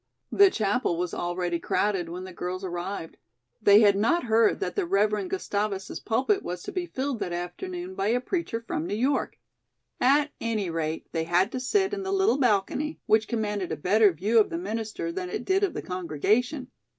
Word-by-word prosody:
The 400 -1 +6
Chapel 210 - 0
was 180 0 -2
already 175 -1 -2
crowded 190 -4 0
when 180 +2 -6
the 185 -1 -9
girls 180 +2 -4
arrived. 175 -1 -5 0.4
They 205 0 +7
had 205 -2 +5
not 235 +13 +2
heard 225 -2 +3
that 180 - -3
the - - 0
Rev. 210 - +1
Gustavus's 205 - -2
pulpit 260 - +1
was 180 0 -5
to - - -6
be 360 -1 -3
filled 265 -5 -3
that 175 - -3
afternoon 350 - -5
by 205 - -1
a 240 +3 +2
preacher 250 -5 -3
from 160 -7 -3
New 200 - -2
York. 265 +6 0 0.6
At 290 +4 +3
any 215 -6 -1
rate, 160 -1 -3
they 160 -1 -1
had 180 +6 +2
to 260 - -3
sit 385 +10 +1
in 400 - -2
the 385 0 -3
little 390 -5 +2
balcony, 250 +6 +1
which 220 0 +3
commanded 210 -5 -2
a - - -2
better 200 +6 +4
view 205 +8 +2
of 215 - +3
the 335 - -3
minister 220 - -4
than 180 +1 -4
it 245 - -4
did 385 +1 +2
of 395 - 0
the - - -4
congregation. 205 - -1
210 Hz, 195 wpm, -27 LUFS, 180-260 Hz, 0.6 s, They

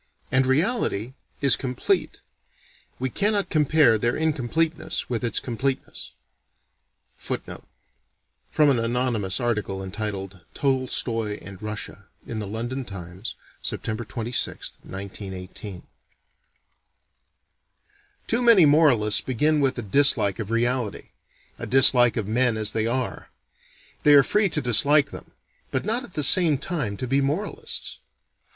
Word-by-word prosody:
And 130 0 +2
reality 130 - 0 0.3
is 140 -2 +5
complete. 130 -2 -2 0.8
We 130 0 -3
cannot 205 - 0
compare 150 -7 +3
their 120 +2 0
incompleteness 160 0 -2
with 120 -1 -2
its 115 -3 0
completeness." 130 +2 -4 1.1
From - - -4 1.3
an 125 - +1
anonymous 115 -4 -1
article 105 -5 -2
entitled 95 -2 -5
"Tolstoy 120 -5 -1
and 95 -2 -11
Russia" 105 -2 -7 0.2
in 115 - -5
the 105 - -5
London 120 +6 -4
Times, 95 -1 -8 0.3
Sept. - - -2
26,1918. 100 -4 -6 2.4
Too 235 +2 0
many 230 -8 +6
moralists 145 -9 +3
begin 150 +5 0
with 135 -3 0
a 120 - -4
dislike 105 -3 +4
of 110 -2 -5
reality: 120 -1 -1 0.5
a - - -6
dislike 125 -3 +6
of 105 -3 -2
men 115 +1 +2
as 105 -1 +3
they 110 0 -1
are. 125 +1 -3 0.7
They 145 -1 +6
are 140 - +7
free 210 +4 +1
to 150 - 0
dislike 140 +4 +4
them - - -11 0.4
but 130 - -2
not 230 +5 0
at 190 - -13
the 150 - -1
same 160 0 +6
time 135 - -3
to 130 - -4
be 135 +3 +1
moralists. 200 - -3
125 Hz, 120 wpm, -24 LUFS, 110-145 Hz, 2.4 s, are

